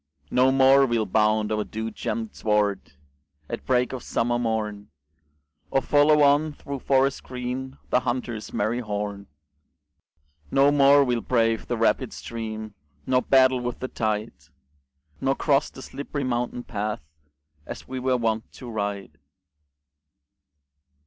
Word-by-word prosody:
No 130 +1 +4
more 135 +1 +5
we'll 115 -3 0
bound 105 +1 +2
o'er 105 0 0
dew 110 +1 -5
gemmed 225 -1 -4
sward 105 -7 0 0.5
At - - -6
break 125 0 +2
of 130 - -5
summer 120 +2 -1
morn, 110 -3 -2 0.8
Or - - +2
follow 145 +3 +4
on, 145 +2 +3
through 140 -1 -7
forests 135 +1 +2
green, 130 +1 -5
The 125 - +4
hunter's 120 -3 -4
merry 110 +4 -1
horn; 105 -3 -4 1.2
No 140 - +4
more 140 0 +6
we'll 120 -3 0
brave 115 -2 +1
the - - -2
rapid - - +1
stream, 110 -2 -6 0.3
Nor 130 0 +2
battle 130 -1 +4
with 125 0 -4
the 130 - -4
tide, 110 -2 -2 0.9
Nor 135 0 +1
cross 140 0 +2
the 130 - -12
slipp'ry 145 0 -5
mountain 125 -1 -2
path, 105 -7 -4 0.6
As - - -8
we 130 0 -5
were 130 0 +1
wont 115 -2 -1
to 125 -3 -9
ride. 100 -7 -4
120 Hz, 135 wpm, -25 LUFS, 110-135 Hz, 1.2 s, more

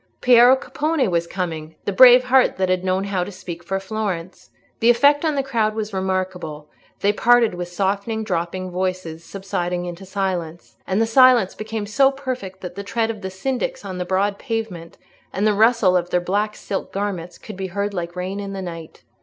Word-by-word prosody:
Piero 245 +1 +7
Capponi 300 0 -1
was 170 -2 0
coming—the 165 0 -5
brave 250 +3 +8
heart 255 +1 +3
that 185 -1 0
had 185 0 +1
known 185 +1 0
how 195 -2 -1
to 195 - -7
speak 175 -2 -8
for 195 +3 -2
Florence. 190 -3 -5 0.3
The 230 - +4
effect 285 +5 +4
on 310 -2 +1
the 275 - 0
crowd 225 -5 0
was 215 -1 -4
remarkable; 185 -5 -3 0.3
they 205 +1 +3
parted 235 0 +4
with 175 0 -5
softening, 200 +4 -2
dropping 185 -1 -3
voices, 180 -3 -3
subsiding 180 -2 -3
into 175 +2 -7
silence,—and 185 0 -3
the 225 - +3
silence 245 -3 +5
became 215 -1 -5
so 270 +6 +4
perfect 255 -9 -6
that 180 - -7
the 200 - -6
tread 225 +2 -1
of 215 -2 -10
the 190 - -4
syndics 265 - -3
on 185 -1 -5
the - - -1
broad 195 +2 0
pavement, 220 -9 -5 0.3
and 195 +3 -1
the 215 - +4
rustle 220 -3 +4
of 175 -1 0
their 180 - +2
black 205 +4 -1
silk 195 - -5
garments, 190 -4 -4
could 215 - -10
be 190 0 -4
heard, 200 +2 -3
like 175 -1 -4
rain 185 +2 -4
in 200 -1 -5
the 195 - -5
night. 165 -3 -9
195 Hz, 190 wpm, -21 LUFS, 180-225 Hz, 0.3 s, brave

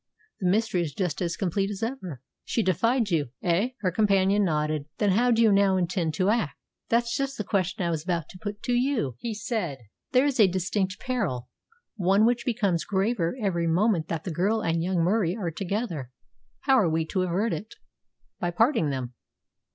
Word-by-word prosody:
The 185 -4 +1
mystery 215 -2 +1
is 150 -5 -4
just 180 -5 -2
as 170 -1 -1
complete 195 +1 0
as 205 +1 -5
ever." 190 - -5 0.2
"She 230 - 0
defied 225 +4 +1
you 150 -6 +1
eh?" 190 +9 +1
Her 185 -3 +1
companion 200 0 +3
nodded. 150 -4 0
"Then 205 -2 +2
how 240 +6 +3
do 230 -1 +4
you 220 - +5
now 195 -1 +4
intend 175 -3 -1
to 185 +4 +2
act?" 190 -12 0 0.3
"That's 235 0 +1
just 275 0 -2
the 210 - -2
question 190 -1 -1
I 170 - 0
was 155 -2 -2
about 170 -3 -1
to 185 - -12
put 205 +1 -6
to 250 - -1
you," 245 - +1
he 225 -2 -4
said. 205 - -2 0.3
"There 255 +2 +4
is 280 -4 0
a 210 - +8
distinct 190 +2 -1
peril 185 - -2 0.5
one 195 +2 +4
which 240 0 +1
becomes 205 -9 +1
graver 195 0 0
every 175 -6 0
moment 170 -1 +2
that 165 -2 -3
the 180 - -4
girl 200 +7 +1
and 165 0 0
young 175 -1 +1
Murie 185 0 +1
are 180 -6 -2
together. 180 - -3 0.5
How 270 -2 +4
are 185 -6 +3
we 160 0 0
to 185 +3 -1
avert 185 +5 0
it?" 220 - -6 0.6
"By 175 -4 0
parting 225 - +2
them." 130 -3 -4
190 Hz, 195 wpm, -26 LUFS, 170-225 Hz, 0.6 s, a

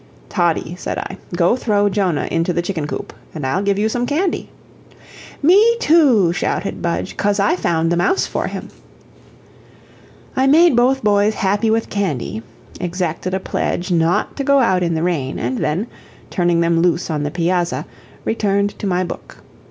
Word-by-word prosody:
"Toddie," 175 -2 0
said - - -4
I, 190 - -6 0.2
"go 175 +5 +3
throw 205 -5 +1
Jonah 190 -6 0
into 165 +2 0
the 175 0 -1
chicken 170 -5 -3
coop, - - -6 0.2
and 150 -4 -4
I'll 150 +9 0
give 200 -1 +1
you 210 +2 +1
some 245 +2 -1
candy." 335 +6 -1 0.9
"Me 420 +9 +5
too," 265 - +4
shouted 195 - -2
Budge, 170 +2 -2
"cos 205 0 +1
I 200 -1 +3
found 165 -2 0
the 175 - +1
mouse 185 - +2
for - - -3
him." - - -6 1.7
I 265 0 +2
made 320 +1 +5
both 255 +2 +2
boys 205 0 +3
happy 205 +3 +1
with 225 +1 0
candy, 155 - -2 0.4
exacted 180 0 -2
a - - -1
pledge 180 0 -2
not 170 0 +1
to 280 - -1
go 280 +1 +4
out 190 -9 +3
in 170 -2 0
the 160 - -1
rain, 155 -7 -1
and 125 +2 -2
then, 160 +6 -1 0.5
turning 175 -2 +1
them 170 0 +2
loose 175 -1 +1
on 150 -2 -1
the 145 - -1
piazza, 175 +2 -1 0.4
returned 200 -2 +1
to 205 - -3
my 180 -1 +1
book. 175 - -8
185 Hz, 170 wpm, -19 LUFS, 170-215 Hz, 1.7 s, Me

